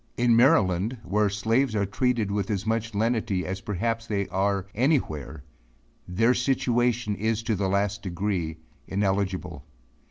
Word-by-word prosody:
In 120 -1 +4
Maryland 115 - +3
where 105 +1 +1
slaves 110 +4 +1
are 100 -1 +1
treated 115 0 0
with 100 0 -1
as 100 -2 -2
much 115 0 -1
lenity, 110 -3 0
as 95 +1 -4
perhaps 115 +3 -2
they 100 -2 -1
are 95 0 0
any 135 +7 +3
where, 75 - -6 0.6
their 115 +7 +3
situation 120 -3 +1
is 110 +2 -1
to 110 0 0
the 95 -1 -1
last 100 +1 0
degree 90 -3 -2 0.3
ineligible. 95 -5 -1
105 Hz, 140 wpm, -26 LUFS, 95-115 Hz, 0.6 s, In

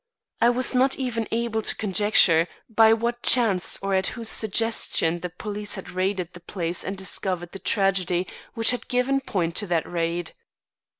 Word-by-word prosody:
I 235 - +6
was 250 +2 0
not 260 +1 +2
even 235 -4 -2
able 230 -1 -1
to - - -1
conjecture 195 -5 +3 0.2
by 225 -1 +5
what 235 +2 0
chance 210 -8 +3
or 195 0 -1
at 190 0 +2
whose 230 -1 -2
suggestion 220 -6 +1
the 180 - -5
police 205 +4 -5
had 190 - -8
raided 185 -1 -2
the 175 - -11
place 175 -1 -3
and 195 +1 -5
discovered 185 -2 -3
the 195 - -8
tragedy 185 -2 +1 0.3
which 225 0 +2
had 245 - -5
given 260 +2 +1
point 175 -9 -2
to 205 - -2
that 170 -3 0
raid. 170 0 -2
200 Hz, 170 wpm, -24 LUFS, 180-230 Hz, 0.3 s, I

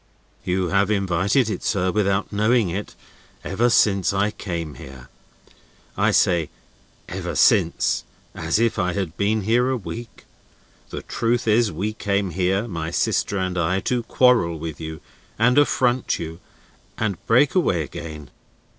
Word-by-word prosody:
"You 90 0 -1
have 100 +2 +2
invited 100 +4 +1
it, 110 - -3
sir, 95 -3 0
without 100 0 0
knowing 110 0 +2
it, 100 +4 -5 0.5
ever 120 +1 +1
since 100 -5 +3
I 105 +2 +1
came 85 -7 -5
here. 65 -2 -12 0.9
I - - +2
say 85 -4 +2 0.6
'ever - - -5
since,' - - +3 0.3
as - - -1
if 115 0 +1
I 90 0 0
had 90 -5 -3
been 105 +4 0
here 120 +5 +2
a 130 - 0
week. 115 +1 -9 0.6
The - - -6
truth 120 +1 -1
is, 110 0 +3
we 100 +7 -3
came 100 -3 -1
here 95 +5 0
(my 85 -5 -4
sister 100 +3 0
and 95 -1 -1
I) 90 +3 +1
to 125 +3 0
quarrel 115 -8 +3
with 80 0 -6
you, 80 0 -7 0.4
and 125 +5 +4
affront 130 -3 +1
you, 80 0 -7 0.6
and 105 -5 -2
break 125 +5 +4
away 95 - +2
again." 75 -1 -8
100 Hz, 145 wpm, -22 LUFS, 85-115 Hz, 0.9 s, and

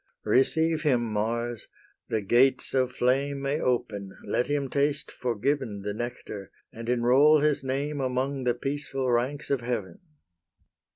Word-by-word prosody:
Receive 160 +4 +2
him, 130 -7 +2
Mars! 115 +2 -2 0.4
the 110 -2 -1
gates 125 +6 +3
of 130 -1 +2
flame 135 +3 +1
May 140 +2 -1
open: 105 -6 -2
let 125 - 0
him 145 -1 0
taste 140 0 0
forgiven 120 -3 -2
The 105 0 -2
nectar, 110 -4 -6 0.2
and 115 +1 -6
enrol 130 +5 +5
his 150 -2 +1
name 140 +2 -2
Among 130 +1 -1
the 120 -1 +1
peaceful 135 -1 -2
ranks 130 +6 -1
of 135 -3 +1
Heaven. 115 -7 -3
130 Hz, 135 wpm, -27 LUFS, 120-140 Hz, 0.4 s, enrol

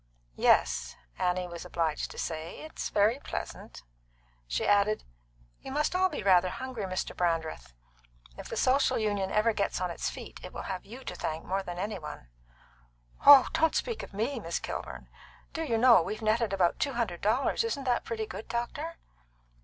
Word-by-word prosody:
"Yes," - - +3 0.2
Annie 180 0 0
was 170 -1 -7
obliged 165 -3 -1
to - - -11
say; 160 0 -4
"it's 315 - -5
very 215 +5 +3
pleasant." - - -7 0.6
She - - -1
added: 205 +1 +3 0.6
"You - - -8
must 300 +5 0
all 375 0 +3
be 295 - -5
rather 185 -2 +5
hungry, 255 -1 -5
Mr. 185 0 -3
Brandreth. 160 - -1 0.6
If - - -9
the - - -4
Social 265 +2 +3
Union 205 -3 0
ever 215 +3 +2
gets 200 -3 -1
on 180 -1 -1
its - - -2
feet, - - -9
it - - -8
will - - -5
have 185 -2 -5
you 245 +5 -10
to - - -5
thank 160 -2 -4
more 195 +1 -1
than 175 -2 -6
any 200 +1 -3
one." 150 - -9 1.0
"Oh, 280 -2 +11
don't 320 0 +2
speak 465 -2 -1
of - - -9
me, 230 +6 -2
Miss 170 -5 -3
Kilburn! - - -6 0.5
Do 325 - -3
you 240 -8 0
know, 235 -3 +7
we've 215 +6 -4
netted 220 0 +2
about 185 -3 +2
two 280 - 0
hundred 220 -8 -2
dollars. 230 - +2
Isn't 370 -12 -2
that 250 -2 +1
pretty 220 -1 -3
good, 215 - -8
doctor?" 285 +8 -3
205 Hz, 180 wpm, -29 LUFS, 175-255 Hz, 1.0 s, Oh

